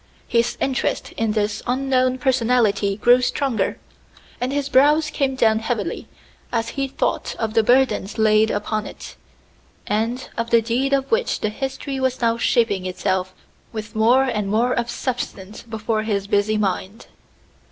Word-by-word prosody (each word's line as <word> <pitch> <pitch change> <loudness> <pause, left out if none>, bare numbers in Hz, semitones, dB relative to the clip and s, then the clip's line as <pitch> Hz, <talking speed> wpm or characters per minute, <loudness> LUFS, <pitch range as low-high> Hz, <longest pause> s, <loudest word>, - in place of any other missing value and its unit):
His 235 0 +1
interest 265 -2 -1
in 225 -1 -1
this 210 0 -1
unknown 255 0 +1
personality 230 -6 +1
grew 245 +3 +5
stronger; 250 -1 -1 0.6
and 250 +2 -1
his 285 0 -1
brows 300 +4 +4
came 270 -2 0
down 220 -3 +3
heavily 225 -1 -3 0.4
as 230 -1 -1
he 275 -1 -2
thought 270 - -2
of 220 -2 -2
the 225 - +4
burdens 240 -3 +2
laid 215 0 +4
upon 215 +1 -2
it, - - -10 0.7
and 225 +5 -1
of 230 0 -2
the 235 - +5
deed 240 +4 -1
of 275 -1 0
which 465 +1 +1
the 215 - 0
history 270 +3 -4
was 260 -1 0
now 230 -2 +2
shaping 200 -8 +1
itself 185 0 -2 0.4
with 215 0 -7
more 235 +5 +4
and 210 -6 -1
more 235 +4 +2
of 240 0 -1
substance 215 -6 -4
before 220 -1 -2
his 205 -3 -1
busy 205 +1 +1
mind. 200 +1 -2
230 Hz, 150 wpm, -21 LUFS, 215-260 Hz, 0.7 s, grew